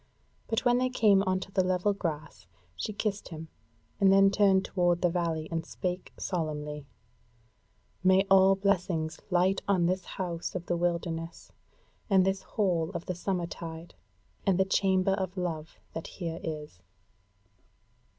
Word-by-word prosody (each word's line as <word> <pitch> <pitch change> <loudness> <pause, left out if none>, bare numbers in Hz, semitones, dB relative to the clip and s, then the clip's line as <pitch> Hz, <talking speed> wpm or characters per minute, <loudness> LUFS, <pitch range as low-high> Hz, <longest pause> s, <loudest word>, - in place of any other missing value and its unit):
But 225 +3 -1
when 245 0 +4
they 255 0 +1
came 210 -6 +4
on 185 0 +2
to 195 - -8
the 190 -1 +2
level 185 +2 +1
grass 165 -5 -5 0.3
she 90 - -3
kissed 205 -1 -3
him, 160 -1 -8 0.5
and 195 -1 +5
then 195 0 +6
turned 195 -1 +4
toward 175 -1 +1
the 175 - +3
valley 165 -3 -1
and 165 0 -1
spake 180 +2 -4
solemnly: 150 -4 -3 1.2
"May 190 +1 +5
all 195 0 +6
blessings 180 -5 0
light 185 +1 +2
on 185 -4 +3
this 185 +1 0
House 175 -2 -3
of 175 -1 -4
the 175 - 0
wilderness 170 -1 -3 0.6
and 190 -2 +5
this 190 0 0
Hall 180 -6 0
of 170 - -4
the 180 - -2
Summer 180 0 -2
tide, 165 0 -8 0.5
and 195 -3 +2
the 190 - +3
Chamber 190 0 +2
of 190 -1 -3
Love 165 -3 -4 0.2
that 165 - -5
here 170 -3 -5
is!" 150 - -6
180 Hz, 150 wpm, -29 LUFS, 165-195 Hz, 1.2 s, then